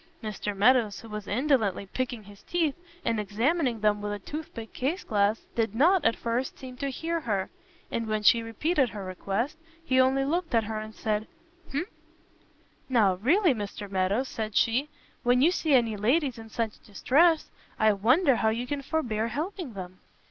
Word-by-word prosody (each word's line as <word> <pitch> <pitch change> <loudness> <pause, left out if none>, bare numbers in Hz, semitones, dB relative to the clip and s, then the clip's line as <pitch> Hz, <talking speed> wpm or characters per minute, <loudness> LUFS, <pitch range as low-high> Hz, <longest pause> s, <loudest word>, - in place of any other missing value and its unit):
Mr 210 -1 -4
Meadows, 225 -1 +3
who 225 - -12
was 210 -1 -6
indolently 225 -5 +1
picking 245 +2 -4
his 200 0 -15
teeth, 330 -5 0 0.3
and 230 -2 +1
examining 235 - 0
them 210 -1 +2
with 205 0 -3
a 205 - -2
tooth 305 +10 -7
pick 225 -1 -8
case 300 +9 -2
glass, 205 +1 +1
did 225 -2 -1
not, 345 +9 +4
at 230 - +3
first, 240 +3 -2
seem 255 -1 -9
to 275 +1 -2
hear 330 +5 -2
her; 200 -9 -2 0.4
and 230 -1 -2
when 215 -1 -1
she 230 +3 +6
repeated 260 - 0
her 205 -3 -7
request, 200 - -3 0.3
he 260 -3 +3
only 265 +1 +2
looked 330 -1 -1
at 225 - +4
her, 215 0 -3
and 215 0 -8
said 215 0 -1 0.4
"umph?" 295 +7 -2 1.0
"Now 220 -7 +4
really, 320 - +3
Mr 205 -2 -5
Meadows," 195 +6 0
said 215 -3 -5
she, 255 +6 +2 0.3
"when 245 0 +3
you 310 +7 +5
see 315 -5 +2
any 230 -4 +3
ladies 250 +5 +1
in 225 0 -10
such 225 -1 -3
distress, 310 - +3 0.3
I 215 -1 +4
wonder 255 - +3
how 220 - +2
you 230 +3 -2
can 280 +2 -3
forbear 240 -7 -1
helping 310 - -4
them." 185 -1 -8
230 Hz, 180 wpm, -28 LUFS, 210-275 Hz, 1.0 s, she